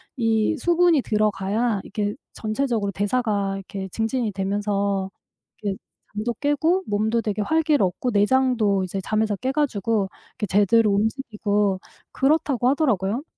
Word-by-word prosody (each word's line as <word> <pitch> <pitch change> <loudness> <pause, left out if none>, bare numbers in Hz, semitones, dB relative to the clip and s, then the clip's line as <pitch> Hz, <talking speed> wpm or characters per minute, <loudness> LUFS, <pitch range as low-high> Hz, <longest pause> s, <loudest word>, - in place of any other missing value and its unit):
이 225 +2 +1
수분이 345 +1 +3
들어가야 215 0 0
이렇게 205 0 -3 0.2
전체적으로 220 -2 -1
대사가 205 -1 0
이렇게 195 0 -6
증진이 225 +3 -1
되면서 200 0 -1 0.5
그 205 -2 -1 0.4
잠도 215 +3 -2
깨고 315 +6 +1
몸도 215 +3 +1
되게 210 -1 -2
활기를 310 +2 +2
얻고 215 +7 -2
내장도 215 -2 +2
이제 190 +1 -4
잠에서 215 +1 0
깨 255 +7 -2
가지고 225 -8 0 0.4
제대로 210 +2 +4
움직이고 210 -3 0 0.3
그렇다고 270 -4 +2
하더라고요. 250 - +1
215 Hz, 315 characters per minute, -23 LUFS, 200-255 Hz, 0.5 s, 제대로